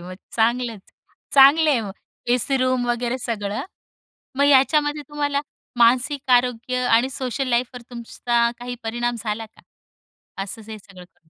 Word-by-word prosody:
मग 180 +1 -9 0.2
चांगलंच 230 -2 0 0.5
चांगल 280 +4 +7
आहे 275 -6 +3
मग. 210 -3 -6 0.4
एसी 245 +3 +1
रूम 255 -1 0
वगैरे 240 +1 -1
सगळं 220 -1 -3 0.8
मग 280 - +4
याच्यामध्ये 295 +2 +3
तुम्हाला 290 -1 -1 0.4
मानसिक 255 +4 +2
आरोग्य 250 0 +1
आणि 235 +3 +4
सोशल 260 0 -3
लाईफवर 245 0 -1
तुमचा 235 0 -1
काही 245 0 -6
परिणाम 240 +2 -2
झाला 220 0 -3
का? 220 - -22 0.8
असच 215 +2 -9
हे 220 - -6
सगळं 195 -2 -14
करून? 165 -2 -36
245 Hz, 140 wpm, -22 LUFS, 225-265 Hz, 0.8 s, चांगल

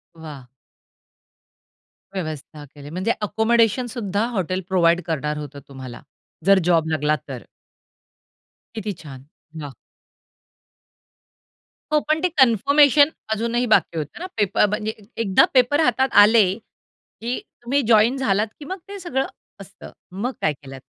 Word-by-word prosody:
वाह! 150 -6 -11 1.7
व्यवस्था 155 -4 -6
केली. 145 0 -11
म्हणजे 185 +7 -1
अकोमोडेशन 225 +3 +2
सुद्धा 205 -2 -1
हॉटेल 185 0 -1
प्रोव्हाईड 175 -1 +3
करणार 150 -2 -2
होतं 145 -1 -8
तुम्हाला 130 -3 -10 0.4
जर 195 0 +6
जॉब 165 -2 +2
लागला 155 -1 +1
तर. 130 -3 -7 1.3
किती 215 -2 -4
छान. 135 -4 -11 0.4
वाह! 145 -2 -7 2.2
हो, 305 - +5
पण 310 +1 0
ते 365 - +3
कन्फर्मेशन 285 +5 +5 0.3
अजूनही 235 +2 -1
बाकी 170 -3 +2
होतं 150 -2 -5
ना 355 - -5
पेप 205 -3 -1
म्हणजे 210 +1 +1 0.3
एकदा 195 -3 +4
पेपर 260 +3 +3
हातात 265 -1 +2
आले 220 +1 +6
की 235 +1 -9 0.2
तुम्ही 275 +4 +1
जॉइन 230 +3 +4
झालात 210 -4 +1
की 295 - -9
मग 375 +5 -5
ते 400 0 -8
सगळं 270 -7 -2 0.4
असतं. - - -13 0.2
मग 210 +8 -3
काय 155 - +1
केलंत? 135 -2 -12
205 Hz, 125 wpm, -22 LUFS, 155-245 Hz, 2.2 s, जर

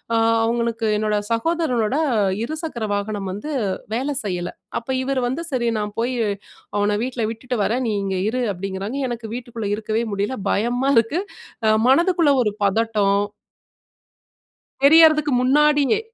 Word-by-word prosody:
அ - - +3 0.3
அவங்களுக்கு 230 0 -1
என்னோட 215 0 0 0.2
சகோதரனோட 250 -3 0 0.5
இருசக்கர 310 -4 -4
வாகனம் 205 -1 -3
வந்து 210 +11 -5 0.4
வேல 270 +5 -1
செய்யல. 180 -3 -3 0.3
அப்போ 235 +3 -6
இவரு 265 0 -1
வந்து, 270 +7 -3
"சரி 245 -3 0
நான் 210 0 -4
போய் 245 +2 0 0.6
அவன 205 0 +1
வீட்ல 245 -3 -2
விட்டுட்டு 245 +2 -4
வரன். 245 +5 0
நீ - - 0
இங்கேயே 190 0 -1
இரு" 255 +1 -1
அப்டீங்கிறாங்க. 195 +7 -4
எனக்கு 235 -2 -5
வீட்டுக்குள்ள 235 -4 -5
இருக்கவே 220 +1 -2
முடியல, 205 +6 -2
பயமா 245 +5 +1
இருக்கு. 230 +10 +2 0.5
அ 215 - +5
மனதுக்குள்ள 335 +1 +4
ஒரு 210 -2 -1
பதட்டோ. 215 0 +1 1.8
தெரியறதுக்கு 310 0 +6
முன்னாடியே. 295 +6 +3
235 Hz, 130 wpm, -21 LUFS, 210-275 Hz, 1.8 s, தெரியறதுக்கு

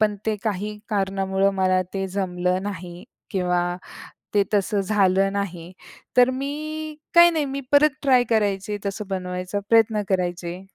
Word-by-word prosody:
पण 210 -1 +2
ते 220 - +2
काही 210 0 -2
कारणामुळं 195 -1 +1
मला 185 -1 +2
ते 195 0 -1
जमलं 180 -1 -1
नाही 180 -3 -7 0.3
किंवा 180 -1 0 0.6
ते 205 -1 +4
तसं 205 +1 +1
झालं 195 -1 +2
नाही, 180 -4 -4 0.5
तर 250 0 +7
मी 305 +3 -4 0.2
काही 345 0 +8
नाही 310 -3 0
मी 275 +1 -4
परत 290 +1 +6
ट्राय 255 -3 +4
करायचे. 205 -2 0
तसं 200 +1 -4
बनवायचा 180 +1 -3
प्रयत्न 225 -2 +4
करायचे. 175 -1 -2
195 Hz, 140 wpm, -23 LUFS, 185-220 Hz, 0.6 s, काही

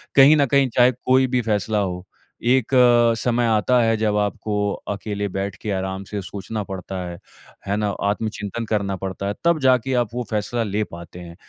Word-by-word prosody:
कहीं 140 +3 +8
न 145 - +4
कहीं 135 0 +2
चाहे 125 0 +6
कोई 130 +1 +2
भी 125 0 0
फैसला 105 +1 0
हो। 90 -2 -3 0.5
एक 130 -2 +2 0.5
समय 120 +1 +1
आता 115 +3 +3
है 115 -1 +2
जब 105 -1 0
आपको 105 +1 -2 0.4
अकेले 100 0 -4
बैठ 95 -1 -2
के 110 - -4
आराम 95 0 -3
से 100 +1 -5
सोचना 105 +3 -5
पड़ता 95 0 -7
है। 85 - -8 0.5
है 100 - 0
ना? 105 -1 0
आत्मचिंतन 105 +2 -2
करना 100 -2 0
पड़ता 95 +1 -5
है 100 - -1
तब 170 -1 +3
जाके 130 0 +3
आप 120 - -3
वो 125 0 -2
फैसला 115 +2 -1
ले 105 0 -1
पाते 85 -2 -10
हैं। 85 -1 -10
105 Hz, 190 wpm, -22 LUFS, 100-120 Hz, 0.5 s, कहीं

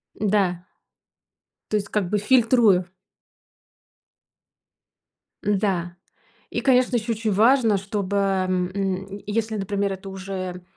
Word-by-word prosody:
Да. 190 -4 0 1.1
То - - +1
есть 205 0 -3
как 200 -4 -1
бы 210 - +1
фильтрую. 225 -4 +4 2.6
Да. 190 -4 0 0.5
И, - - -3
конечно, 255 -2 +3
ещё 230 0 0
очень 220 -1 -2
важно, 225 +1 +4
чтобы, 200 0 -3
м, 190 0 -1
если, 220 +1 -1
например, 200 0 -1
это 190 +1 -8
уже 185 -2 -6
200 Hz, 100 wpm, -23 LUFS, 190-215 Hz, 2.6 s, фильтрую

